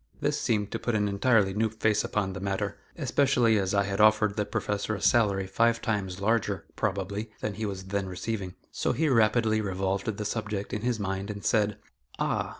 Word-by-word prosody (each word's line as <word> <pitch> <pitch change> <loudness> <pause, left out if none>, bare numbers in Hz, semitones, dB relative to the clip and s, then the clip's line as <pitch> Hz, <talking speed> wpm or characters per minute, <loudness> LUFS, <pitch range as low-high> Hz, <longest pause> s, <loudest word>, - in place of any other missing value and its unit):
This - - 0
seemed 105 -3 0
to - - -3
put 120 - -1
an 105 -1 +2
entirely 100 -1 +3
new 110 +2 +1
face 110 -1 +1
upon 95 -2 -1
the 95 - -5
matter, 95 0 -2 0.2
especially 125 -6 +3
as 95 +1 0
I 100 - +4
had 100 +1 -1
offered 105 -1 +4
the 105 -1 -1
Professor 105 +1 -2
a - - -6
salary 100 -5 +3
five 115 +4 +2
times 100 -5 -2
larger, 100 -3 0
probably, 100 +3 -2
than 105 - -2
he 110 +2 -3
was 95 -2 -5
then 95 0 -2
receiving. 95 0 -4 0.2
So - - 0
he 160 - +1
rapidly 110 -2 +3
revolved 95 0 -2
the 105 - -3
subject 105 -2 -3
in 105 - -2
his 120 -1 0
mind 95 0 -3
and 100 -1 -6
said: 105 -3 +2 0.4
"Ah! - - -1
105 Hz, 195 wpm, -28 LUFS, 100-110 Hz, 0.4 s, I